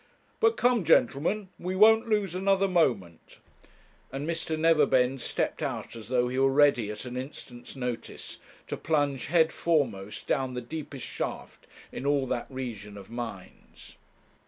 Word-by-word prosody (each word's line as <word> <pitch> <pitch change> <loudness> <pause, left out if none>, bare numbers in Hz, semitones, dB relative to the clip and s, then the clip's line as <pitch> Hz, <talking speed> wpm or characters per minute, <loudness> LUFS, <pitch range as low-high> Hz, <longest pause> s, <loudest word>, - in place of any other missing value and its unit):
But 450 0 +3
come, 245 -4 +3
gentlemen, 165 - +2
we 185 +2 -3
won't 220 +3 +6
lose 205 -5 +1
another 195 +1 +2
moment,' 120 - 0 0.7
and 140 +3 -4
Mr. 165 -1 -2
Neverbend 135 -5 +3
stepped - - -2
out - - -4
as 110 -3 -9
though 125 0 +2
he 130 +1 -2
were 135 0 +4
ready 140 -6 +4
at 105 +4 -6
an 125 0 -6
instant's 130 -2 -8
notice 125 -3 -5 0.3
to - - -5
plunge 145 -4 0
head 160 0 +3
foremost 115 -12 -1
down 130 -3 -1
the - - -2
deepest 140 +1 -7
shaft - - -6 0.2
in 140 - -5
all 140 -2 +2
that 125 -2 -3
region 115 -6 -6
of 100 +2 -12
mines. 115 -6 -9
135 Hz, 150 wpm, -28 LUFS, 120-165 Hz, 0.7 s, won't